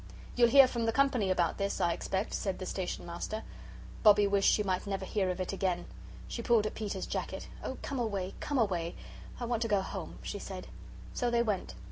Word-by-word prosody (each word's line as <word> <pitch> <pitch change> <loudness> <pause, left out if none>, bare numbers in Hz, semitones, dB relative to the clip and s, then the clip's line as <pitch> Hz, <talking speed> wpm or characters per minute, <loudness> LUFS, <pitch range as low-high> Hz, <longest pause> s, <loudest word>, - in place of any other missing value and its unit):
"You'll 240 -1 +6
hear 275 +1 +9
from 235 -2 -2
the - - +3
Company 255 -6 +2
about 175 -1 +1
this, 200 0 -1
I 170 - +2
expect," 190 +5 -2
said 195 -2 -1
the 185 - -5
Station 185 0 -3
Master. 175 +6 -4 0.6
Bobbie 210 -1 +7
wished 200 0 +4
she 210 - +2
might 185 0 -1
never 195 -1 -2
hear 190 -1 0
of 180 0 -2
it 185 +1 -2
again. 185 -2 0 0.4
She 235 - -4
pulled 230 -2 +3
at 215 - -2
Peter's 205 -3 -3
jacket. - - -4 0.2
"Oh, - - -4
come 275 -3 -3
away, 200 -5 -2
come 290 - -1
away! 180 -7 0 0.4
I 245 - -2
want 235 -1 -1
to 230 - +1
go 205 -3 +3
home," 190 - -6
she - - -4
said. - - -6 0.5
So 245 - 0
they 235 0 +3
went. 210 -5 -2
200 Hz, 210 wpm, -32 LUFS, 185-235 Hz, 0.6 s, hear